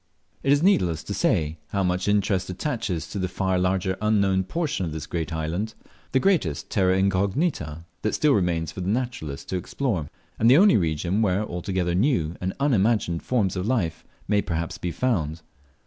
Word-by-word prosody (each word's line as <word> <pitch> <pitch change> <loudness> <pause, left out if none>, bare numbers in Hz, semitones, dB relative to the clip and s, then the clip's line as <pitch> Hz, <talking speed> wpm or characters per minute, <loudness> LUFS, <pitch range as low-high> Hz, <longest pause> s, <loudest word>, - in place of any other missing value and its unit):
It 135 - +1
is 145 +2 +4
needless 90 - +3
to - - -4
say 80 0 0
how 100 -1 -1
much 90 +1 0
interest 100 -2 +1
attaches 95 - -2
to 100 - -3
the 95 - 0
far 95 0 0
larger 95 0 0
unknown 100 -3 +2
portion 150 - -2
of 80 -3 -3
this 80 -1 -5
great 80 -2 -3
island, 80 +7 -3 0.4
the 130 - +3
greatest 140 - +1
terra 95 -2 +3
incognita 95 - 0 0.2
that 110 - 0
still 150 -2 +3
remains 85 - 0
for 95 - -7
the 90 - -2
naturalist 110 - -3
to 95 - -1
explore, 90 - -2 0.3
and 115 - +5
the 130 - +8
only 200 +3 +6
region 85 +3 0
where 100 -1 +2
altogether 90 -1 -2
new 90 - +1
and 95 +1 -1
unimagined 110 - +2
forms 105 -8 0
of 90 +2 -2
life 95 -11 0 0.2
may 105 0 +3
perhaps 85 -2 -3
be 90 - -2
found. 85 -8 -1
95 Hz, 180 wpm, -25 LUFS, 85-110 Hz, 0.4 s, the